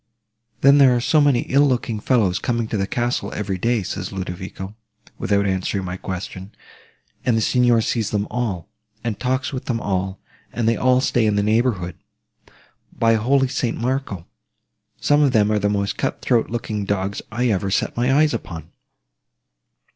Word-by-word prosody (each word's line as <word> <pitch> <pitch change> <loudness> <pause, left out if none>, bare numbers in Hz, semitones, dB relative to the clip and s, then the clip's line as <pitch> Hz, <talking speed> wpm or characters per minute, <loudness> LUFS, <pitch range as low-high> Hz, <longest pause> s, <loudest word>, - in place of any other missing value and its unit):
'Then 140 +1 +6
there 130 -3 +6
are - - +1
so 150 +5 +3
many 140 -4 +3
ill 140 +2 +2
looking 120 -4 -1
fellows 105 -6 +2
coming 120 -2 -1
to 110 - -3
the 95 -2 0
castle 120 +1 -1
every 100 -3 -3
day,' 115 0 +1
says - - -5
Ludovico, 95 +1 -6 0.4
without 100 -1 +1
answering 95 0 -1
my 90 0 -4
question, 95 +1 -6 0.7
'and 120 -3 +2
the - - +3
Signor 120 0 +3
sees 110 -1 -1
them 105 -1 -1
all, 110 -7 -2 0.4
and 110 -4 -3
talks 130 +2 -1
with 130 - -5
them 120 -3 -1
all, 95 -2 -2 0.3
and 115 -1 -1
they 115 - +3
all 125 +2 +3
stay 120 -4 +2
in 105 - +2
the 100 - +2
neighbourhood! 105 -5 0 0.9
By 115 0 +2
holy 130 +5 +2
St. 125 -2 -2
Marco! 120 -7 -2 0.7
some 145 0 +3
of 140 -3 +3
them 105 -1 +3
are 105 - +2
the 105 0 +1
most 100 -1 -1
cut 135 - -1
throat 120 -3 +1
looking 110 -3 -3
dogs 100 0 -2
I 120 +3 0
ever 100 -2 0
set 95 - 0
my 125 +2 +1
eyes 150 +2 +4
upon. 85 -2 -6
110 Hz, 175 wpm, -21 LUFS, 100-125 Hz, 0.9 s, Then